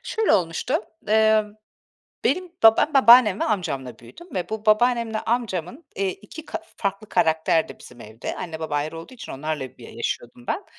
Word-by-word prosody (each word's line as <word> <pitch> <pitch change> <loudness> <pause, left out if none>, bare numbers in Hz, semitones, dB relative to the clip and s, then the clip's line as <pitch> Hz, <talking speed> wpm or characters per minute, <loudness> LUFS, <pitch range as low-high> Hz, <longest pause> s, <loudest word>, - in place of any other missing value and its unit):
Şöyle 445 -3 0
olmuştu. 170 - 0 0.3
Imm, 215 -1 +3 0.7
benim 365 -2 0
baba 225 0 +8
Ben, 305 - +1
babaannem 240 -6 +7
ve - - +2
amcamla 135 - -3
büyüdüm 345 - -14
ve 180 -2 -2
bu 220 0 -5
babaannemle 230 0 +3
amcamın, 225 - -3
eee, 195 0 0
2 260 - -11
ka 335 - -5 0.2
farklı 200 +1 -3
karakterdi 160 0 +1
bizim 125 -1 -14
evde. 110 +1 -7
Anne 160 -2 -6
baba 155 -2 -2
ayrı 155 +3 -3
olduğu 205 +11 -11
için 245 - -9
onlarla 145 -2 -5
bir 120 - -11
yaşıyordum 120 +1 -5
ben. - - -2
200 Hz, 165 wpm, -23 LUFS, 160-230 Hz, 0.7 s, baba